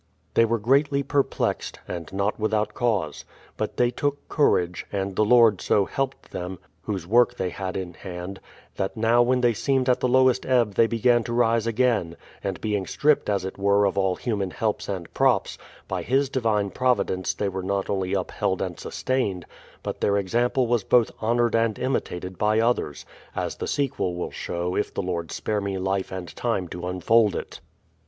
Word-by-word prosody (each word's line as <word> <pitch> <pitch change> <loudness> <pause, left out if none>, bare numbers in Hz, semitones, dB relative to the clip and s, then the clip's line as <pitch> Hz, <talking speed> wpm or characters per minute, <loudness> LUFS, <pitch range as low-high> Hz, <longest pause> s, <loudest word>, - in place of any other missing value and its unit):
They 115 - +5
were 115 +1 +1
greatly 140 +5 +2
perplexed 140 0 -1
— - - -31
and 85 -2 -6
not 100 +3 -1
without 110 0 0
cause. 100 - -1 0.3
But - - -4
they 120 0 +3
took 145 +2 -2
courage, 90 - +1
and 95 -1 -2
the 110 - +3
Lord 115 -2 +5
so 100 - +2
helped 135 +4 -4
them. 90 +1 -5 0.2
Whose 95 -5 -4
work 120 +6 +3
they 90 -1 -2
had 95 0 -4
in 90 -2 -5
hand, 90 +2 -7 0.4
that 95 - -2
now 115 +2 +4
when 125 +1 +2
they 120 -1 +3
seemed 130 +4 0
at 125 - +3
the - - +1
lowest 130 0 +4
ebb 120 -5 +2
they 115 +3 +4
began 120 +1 +3
to 120 - -3
rise 115 -1 +2
again; 115 -8 +1 0.3
and 95 -2 -3
being 105 -3 -1
stripped 150 -5 +2
as 100 -2 0
it 95 - -6
were 100 +1 +3
of 100 - 0
all 95 -2 +1
human 100 -5 -2
helps 105 +2 -2
and 90 -4 -5
props, - - +2 0.3
by - - -2
His 135 +2 +1
divine 110 -6 0
providence 125 -7 0
they 105 - -1
were 95 -1 -3
not 100 +1 -1
only 95 -2 -1
upheld 95 - -1
and - - -4
sustained, 100 -10 -2 0.4
but - - -5
their 100 0 +2
example 120 +6 +1
was 120 -3 +1
both 120 +1 +3
honoured 120 +1 +2
and 115 -2 +1
imitated 95 -8 -3
by 105 +1 +3
others; 115 - 0 0.3
as - - -3
the - - -4
sequel 135 -10 -1
will 90 - -4
show 90 +1 -3
if 105 - -1
the - - -3
Lord 85 -2 -3
spare 105 -1 -2
me 100 -1 -2
life 95 +1 -1
and 95 -2 -6
time 115 -7 -1
to 90 +1 -5
unfold 100 +4 +3
it. - - -6
105 Hz, 190 wpm, -25 LUFS, 95-120 Hz, 0.4 s, They